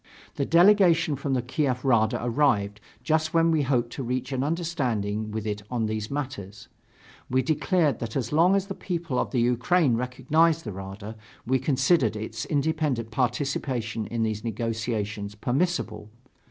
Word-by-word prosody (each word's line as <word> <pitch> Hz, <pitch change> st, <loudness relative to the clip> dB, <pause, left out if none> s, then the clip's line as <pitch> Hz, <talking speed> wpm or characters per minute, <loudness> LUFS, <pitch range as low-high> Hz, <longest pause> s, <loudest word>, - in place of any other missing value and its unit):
The 140 Hz, -, -2 dB
delegation 175 Hz, -3 st, +5 dB
from 135 Hz, 0 st, -2 dB
the 125 Hz, -, -1 dB
Kiev 130 Hz, 0 st, -1 dB
Rada 110 Hz, -4 st, +3 dB
arrived, 115 Hz, -6 st, +1 dB, 0.2 s
just 155 Hz, +3 st, 0 dB
when 165 Hz, 0 st, +4 dB
we 160 Hz, -2 st, +2 dB
hoped 125 Hz, -4 st, 0 dB
to 135 Hz, -, -4 dB
reach 125 Hz, +1 st, -3 dB
an 130 Hz, -1 st, -1 dB
understanding 125 Hz, -, -1 dB
with 110 Hz, 0 st, -4 dB
it 105 Hz, -1 st, -3 dB
on 120 Hz, -3 st, -1 dB
these 110 Hz, 0 st, -3 dB
matters. 125 Hz, -7 st, -6 dB, 0.6 s
We 130 Hz, +1 st, +2 dB
declared 155 Hz, -, +1 dB
that 115 Hz, -1 st, -5 dB
as 125 Hz, -4 st, -2 dB
long 170 Hz, +5 st, +4 dB
as 195 Hz, -1 st, +1 dB
the 195 Hz, -, -5 dB
people 170 Hz, -9 st, -3 dB
of -, -, -1 dB
the 125 Hz, -, 0 dB
Ukraine 125 Hz, +4 st, +2 dB
recognized 145 Hz, +7 st, +1 dB
the 105 Hz, -, -4 dB
Rada, 95 Hz, +3 st, -8 dB, 0.3 s
we 130 Hz, +2 st, +2 dB
considered 130 Hz, -, +2 dB
its 110 Hz, +1 st, -5 dB
independent 145 Hz, -6 st, -1 dB
participation 120 Hz, -3 st, -1 dB
in 115 Hz, -1 st, -2 dB
these 110 Hz, -1 st, -2 dB
negotiations 110 Hz, -2 st, -3 dB
permissible. 120 Hz, -, -1 dB
125 Hz, 155 wpm, -26 LUFS, 110-155 Hz, 0.6 s, delegation